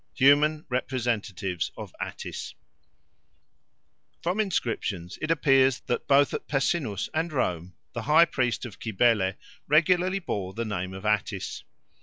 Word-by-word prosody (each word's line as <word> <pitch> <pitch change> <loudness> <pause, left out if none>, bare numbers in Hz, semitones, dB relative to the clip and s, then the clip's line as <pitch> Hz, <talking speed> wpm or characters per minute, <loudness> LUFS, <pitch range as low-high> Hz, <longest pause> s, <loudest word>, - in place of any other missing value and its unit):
Human 150 +3 +4
Representatives 115 - -2
of - - -8
Attis - - -6 1.7
FROM 180 +5 0
INSCRIPTIONS 115 - -2
it 155 - -2
appears 135 -5 +4
that 120 - -3
both 140 0 +4
at - - -4
Pessinus 135 - 0
and 160 +2 -1
Rome 90 - -2 0.2
the 115 - -3
high 155 +7 +6
priest 125 -7 -1
of 110 - -10
Cybele 105 -3 +2 0.3
regularly 180 +5 +3
bore 95 - -4
the 115 +1 -2
name 95 -3 -4
of 95 +2 -9
Attis. 105 -2 -1
125 Hz, 125 wpm, -27 LUFS, 100-150 Hz, 1.7 s, high